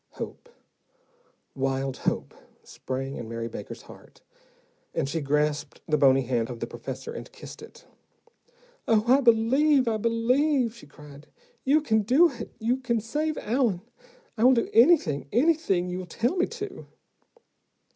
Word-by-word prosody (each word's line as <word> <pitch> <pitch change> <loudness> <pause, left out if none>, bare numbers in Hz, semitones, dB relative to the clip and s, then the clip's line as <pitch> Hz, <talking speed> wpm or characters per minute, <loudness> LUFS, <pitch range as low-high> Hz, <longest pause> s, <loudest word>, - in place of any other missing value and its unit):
Hope, 485 - -8 1.0
wild 135 0 -2
hope, - - -2 0.3
sprang 135 +1 -5
in 115 -2 -7
Mary 115 0 -4
Baker's - - -8
heart, - - -16 0.7
and - - 0
she 160 +3 -2
grasped 150 0 -1
the 155 - +2
bony 135 -2 +4
hand 120 -2 -1
of 120 -2 -7
the - - -2
professor 465 - -7
and - - -8
kissed - - -11
it. - - -14 1.0
"Oh, 220 -2 +3
I 260 +4 +5
believe, 255 +4 +4
I 225 -1 +1
believe," 240 +3 +1
she 190 - -14
cried. 145 0 -14 0.4
"You 295 +4 +3
can 220 -7 +2
do 270 - +4
it. 235 -3 -8
You 235 +3 0
can 240 -3 -1
save 300 +8 -2
Allen. 225 -6 0 0.6
I - - +2
will 255 +1 +7
do 230 - -1
anything, 225 - +4
anything 250 - +2
you 180 0 -5
tell 235 - -1
me 360 - +1
to." 435 -3 -8
225 Hz, 145 wpm, -26 LUFS, -, 1.0 s, will